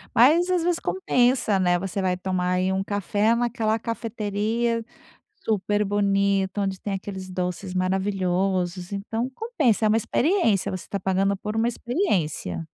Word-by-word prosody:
Mas 320 +9 +5
às 360 -2 +1
vezes 345 0 +1
compensa, 245 - +1
né, 175 -1 +3
você 195 +1 -3
vai 185 -1 +1
tomar 180 -1 -1
aí 185 +1 +1
um 190 0 0
café 205 +3 +1
naquela 235 -2 0
cafeteria, 230 0 -2 0.6
super 210 -1 +1
bonito, 200 -1 +1
onde 195 -1 -2
tem 205 - -3
aqueles 190 -1 -6
doces 180 +1 -3
maravilhosos, 185 -1 0
então 225 +5 -3
compensa, 295 - +1
é - - +5
uma 215 - +4
experiência, 235 - +1
você 185 - -6
tá 200 - -2
pagando 195 +2 +1
por 210 +2 -5
uma 230 +1 +2
experiência. 180 - -1
200 Hz, 145 wpm, -24 LUFS, 190-230 Hz, 0.6 s, Mas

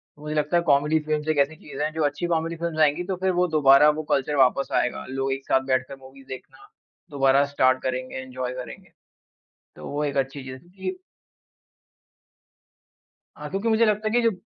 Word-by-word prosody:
तो 145 - -19
मुझे 150 0 -5
लगता 150 +3 +1
है 170 - +1
कॉमेडी 150 +1 +3
फिल्म्स 155 0 -3
एक 155 - +1
ऐसी 140 +3 +2
चीज़ 145 -1 -9
हैं, 155 +1 0
जो 160 -1 -1
अच्छी 145 +4 -2
कॉमेडी 165 0 -1
फिल्म्स 165 -1 -4
आएँगी 155 +3 +3
तो 190 +1 -3
फिर 190 - +3
वो 180 - +3
दोबारा 140 +1 +7
वो - - -3
कल्चर 140 +2 0
वापस 135 0 +3
आएगा। 125 - -3
लोग 135 0 -2
एक 135 0 -7
साथ 130 - +2
बैठकर 130 +1 0
मूवीज 135 +1 -15
देखना 270 - -11 0.4
दोबारा 140 0 +3
स्टार्ट 130 -2 +2
करेंगे, 130 0 -3
एन्जॉय 130 -1 -5
करेंगे। - - -11 0.9
तो - - -10
वो 145 +1 -2
एक 140 -1 -3
अच्छी 135 +1 -2
चीज़ 130 0 -8
है 175 - -22
कि 195 - -6 2.4
हाँ, - - -7
क्योंकि 195 +4 -3
मुझे 225 +1 +4
लगता 215 0 0
है - - -1
कि 240 - +3
जो 230 -1 +3
145 Hz, 200 wpm, -24 LUFS, 135-165 Hz, 2.4 s, दोबारा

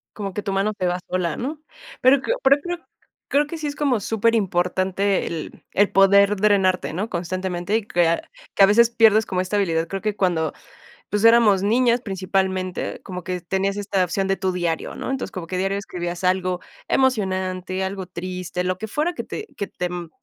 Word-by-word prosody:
Como 195 -3 -5
que 210 - -4
tu 195 - -2
mano 200 +2 +1
se 185 - 0
va 180 +1 -1
sola, 180 -3 -1
¿no?, 290 +5 -4 0.4
pero 260 +1 +5
cr 475 - 0
pero, 275 +1 +6
creo 350 0 -3 0.5
creo 290 +1 +2
que 330 - -6
sí 310 - -5
es 290 - -3
como 275 -7 +1
súperimportante 195 -3 +1
el 160 -2 -6
el 205 +1 +3
poder 200 +1 +5
drenarte, 190 -4 +2
¿no?, 205 +6 -3
constantemente 180 +2 -2
y 225 - +1
crear, 170 -4 +1 0.2
que - - +1
a 195 - +9
veces 235 +3 +5
pierdes 220 -2 +5
como 180 -1 -1
esta 185 +3 -3
habilidad. 165 -5 +1
Creo 195 0 -4
que 210 -1 -1
cuando, 165 -6 0 0.6
pues, 210 +2 -1
éramos 230 -4 +6
niñas 235 +3 +3
principalmente, 190 -2 -2
como 180 -2 -7
que 180 -1 -3
tenías 195 +3 -1
esta 195 -2 0
opción 190 +2 -1
de 195 - +2
tu 190 0 -1
diario, 175 -3 -2
¿no? - - -4
Entonces, 270 - -3
como 180 -4 -6
que 185 - -3
diario 195 +2 0
escribías 175 -2 -4
algo 185 -1 +1 0.3
emocionante, 190 -7 0
algo 190 -1 -4
triste, 180 0 -5
lo 185 0 -1
que 220 +2 -5
fuera 305 +10 -1
que - - -5
te 435 - -6
que 200 - -3
te, 180 - -3
mm, 175 -2 -6
195 Hz, 195 wpm, -22 LUFS, 180-215 Hz, 0.6 s, a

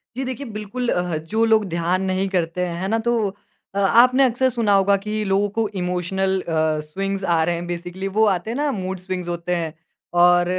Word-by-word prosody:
जी 265 - -2
देखिए, 260 +2 -5
बिल्कुल 240 +4 -4
अ, 180 - +1
ह 165 - -1 0.2
जो 225 - +4
लोग 220 -2 +3
ध्यान 175 +2 0
नहीं 190 +1 0
करते 180 -1 -1
हैं, 175 0 -4
है 190 - -1
ना 225 +2 +1
तो - - +3 0.6
अ, - - 0
आपने 250 +7 +5
अक्सर 260 +1 +2
सुना 225 -4 +1
होगा 200 0 +4
कि 215 0 -1
लोगों 200 +1 +1
को 220 - +2
इमोशनल 190 +2 0
अ, 155 -2 0
स्विंग्स 195 +4 -3
आ 165 -3 +2
रहे 170 +1 0
हैं। 170 - -5
बेसिकली 175 +2 -5
वो 220 - +6
आते 180 +5 -6
हैं 240 - -3
ना 290 -1 +1
मूड 190 -3 -4
स्विंग्स 185 -1 -5
होते 175 +1 -2
हैं 165 -2 -3 0.5
और 175 0 +6
190 Hz, 215 wpm, -22 LUFS, 175-215 Hz, 0.6 s, वो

